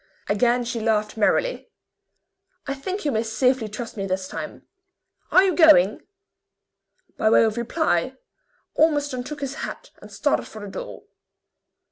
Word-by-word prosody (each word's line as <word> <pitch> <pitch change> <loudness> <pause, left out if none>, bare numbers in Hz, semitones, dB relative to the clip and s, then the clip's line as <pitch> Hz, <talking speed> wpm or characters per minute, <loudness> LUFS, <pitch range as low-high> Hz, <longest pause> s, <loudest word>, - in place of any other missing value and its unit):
Again 240 +4 +2
she 235 0 -3
laughed 215 -1 0
merrily. - - 0 1.0
"I 275 - -2
think 370 +8 -5
you 290 - +1
may 220 -3 0
safely 230 +1 0
trust 225 +2 -7
me 195 -1 -3
this 185 0 -2
time. - - -7 0.7
Are 370 - +7
you 375 -4 +1
going?" 305 - +6 1.2
By 220 - +2
way 225 - +5
of 220 -1 +1
reply, 245 +8 0 0.6
Ormiston 290 -5 +1
took 290 +2 -8
his 275 -1 -3
hat - - -7
and - - -13
started - - 0
for 215 - -10
the 205 - -7
door. - - -8
240 Hz, 145 wpm, -23 LUFS, 215-290 Hz, 1.2 s, Are